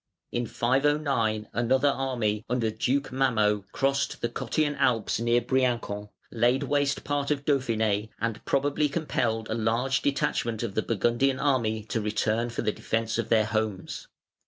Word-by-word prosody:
In 120 Hz, -1 st, -1 dB
509 130 Hz, -5 st, +1 dB
another 130 Hz, +5 st, +2 dB
army, 120 Hz, -6 st, -1 dB
under 115 Hz, -2 st, 0 dB
Duke 130 Hz, +6 st, -1 dB
Mammo, 110 Hz, -6 st, +2 dB
crossed 140 Hz, 0 st, 0 dB
the 120 Hz, -, 0 dB
Cottian 145 Hz, +5 st, -1 dB
Alps 120 Hz, -6 st, +1 dB
near 120 Hz, +1 st, +2 dB
Briancon, 120 Hz, -6 st, -1 dB, 0.2 s
laid 120 Hz, +4 st, +2 dB
waste 140 Hz, 0 st, 0 dB
part 145 Hz, -1 st, -1 dB
of 145 Hz, -1 st, -1 dB
Dauphiné, 110 Hz, -6 st, +1 dB
and 115 Hz, 0 st, -2 dB
probably 145 Hz, +2 st, +1 dB
compelled 120 Hz, -8 st, -1 dB
a -, -, -2 dB
large 115 Hz, +4 st, +1 dB
detachment 135 Hz, -5 st, 0 dB
of 110 Hz, -4 st, -3 dB
the 110 Hz, -, +1 dB
Burgundian 120 Hz, +5 st, +1 dB
army 115 Hz, -6 st, +1 dB
to 110 Hz, +1 st, -2 dB
return 110 Hz, +2 st, 0 dB
for 120 Hz, -, -3 dB
the 105 Hz, -, +1 dB
defence 115 Hz, +2 st, -2 dB
of 115 Hz, -1 st, -2 dB
their 110 Hz, -2 st, +4 dB
homes. 110 Hz, -3 st, -3 dB
120 Hz, 150 wpm, -27 LUFS, 110-135 Hz, 0.2 s, their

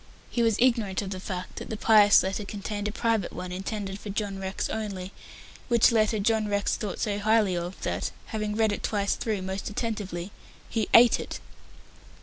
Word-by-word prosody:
He 240 Hz, -, 0 dB
was 225 Hz, -2 st, +3 dB
ignorant 230 Hz, -6 st, +2 dB
of 195 Hz, -, -6 dB
the 185 Hz, -, -4 dB
fact 185 Hz, -1 st, -6 dB
that -, -, -6 dB
the 220 Hz, -, -4 dB
pious 210 Hz, -2 st, +6 dB
letter 195 Hz, +3 st, -2 dB
contained 205 Hz, 0 st, -4 dB
a -, -, -2 dB
private 225 Hz, -3 st, 0 dB
one 180 Hz, 0 st, -6 dB
intended 195 Hz, +1 st, -4 dB
for 210 Hz, -, -8 dB
John 200 Hz, -1 st, -3 dB
Rex 190 Hz, 0 st, -3 dB
only, 195 Hz, -4 st, -4 dB, 0.5 s
which 235 Hz, -1 st, +5 dB
letter 220 Hz, -1 st, +2 dB
John 215 Hz, +1 st, +1 dB
Rex 205 Hz, -1 st, 0 dB
thought 205 Hz, -4 st, -4 dB
so 205 Hz, -1 st, -1 dB
highly 215 Hz, -3 st, +3 dB
of, 175 Hz, +2 st, -4 dB
that, -, -, -1 dB, 0.2 s
having 215 Hz, -2 st, -3 dB
read 220 Hz, -1 st, +2 dB
it 205 Hz, -, -3 dB
twice 200 Hz, -2 st, 0 dB
through 210 Hz, -4 st, -2 dB
most 190 Hz, +1 st, -4 dB
attentively, 205 Hz, -5 st, -4 dB, 0.4 s
he 225 Hz, -, -1 dB
ate 235 Hz, +1 st, +7 dB
it. -, -, -6 dB
205 Hz, 185 wpm, -27 LUFS, 195-220 Hz, 0.5 s, ate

